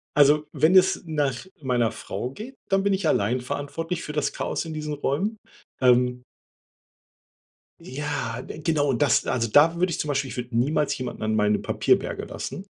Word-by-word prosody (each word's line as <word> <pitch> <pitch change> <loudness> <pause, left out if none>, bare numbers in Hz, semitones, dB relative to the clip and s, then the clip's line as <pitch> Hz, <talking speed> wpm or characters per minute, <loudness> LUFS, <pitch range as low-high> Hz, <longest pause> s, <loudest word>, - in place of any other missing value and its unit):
Also 150 +1 +5
wenn 165 +4 +3
es 185 0 +4
nach 145 -4 -1 0.2
meiner 120 -5 +1
Frau 120 +7 -5
geht, 240 - -10
dann 195 0 +2
bin 200 - +2
ich 190 -3 0
allein 120 -1 +2
verantwortlich 165 +7 -4
für - - -5
das 150 -1 -1
Chaos - - -3
in 160 - -6
diesen 150 -1 -4
Räumen, 150 +10 -1 0.4
ähm 125 -1 +3 1.6
Ja, 130 -4 -4
genau, 150 -2 -1
und 130 -1 0
das 145 -5 +3
also 115 -2 0
da 155 +8 +5
würde 180 +2 +1
ich - - -3
zum 150 - -2
Beispiel, 140 -1 -1
ich - - -8
würde 125 -1 -5
niemals 145 +4 +1
jemanden 125 -3 -5
an 110 0 0
meine 105 0 +2
Papierberge - - 0
lassen, 190 - -6
145 Hz, 175 wpm, -25 LUFS, 125-160 Hz, 1.6 s, Also